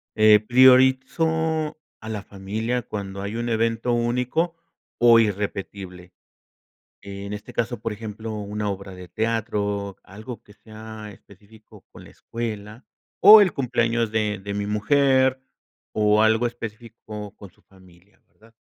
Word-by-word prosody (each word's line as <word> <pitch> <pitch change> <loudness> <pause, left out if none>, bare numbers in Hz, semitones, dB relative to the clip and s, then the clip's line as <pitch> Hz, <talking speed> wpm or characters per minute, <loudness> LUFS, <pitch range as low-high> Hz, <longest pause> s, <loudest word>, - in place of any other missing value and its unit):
eh, 110 -1 +6
priorizo 130 +6 +3 0.2
a 110 - -9
la 105 -2 -4
familia 110 +5 -4
cuando 100 -2 -6
hay 100 +2 -5
un 120 0 -3
evento 115 +1 0
único 125 +8 0 0.4
o 120 -1 +7
irrepetible. 100 -3 -4 0.9
En 100 0 -8
este 105 - -9
caso, 120 -1 -2
por 115 0 -3
ejemplo, 110 +1 -7
una 105 0 -4
obra 100 -1 -7
de 90 -1 -11
teatro, 105 -1 -2
algo 110 +5 -10
que 105 - -19
sea 110 0 -11
específico 105 +3 -19
con - - -14
la - - -15
escuela, 110 0 -7 0.3
o 215 +1 +10
el 185 -6 +3
cumpleaños 120 -3 0
de 105 -2 -1
de 100 +1 -6
mi 100 0 -3
mujer, 130 +5 +2 0.5
o 105 0 +3
algo 110 +2 +3
específico 110 -3 -8
con 100 - -12
su - - -31
familia, 95 0 -23
¿verdad? 115 +1 -24
110 Hz, 135 wpm, -23 LUFS, 100-120 Hz, 0.9 s, o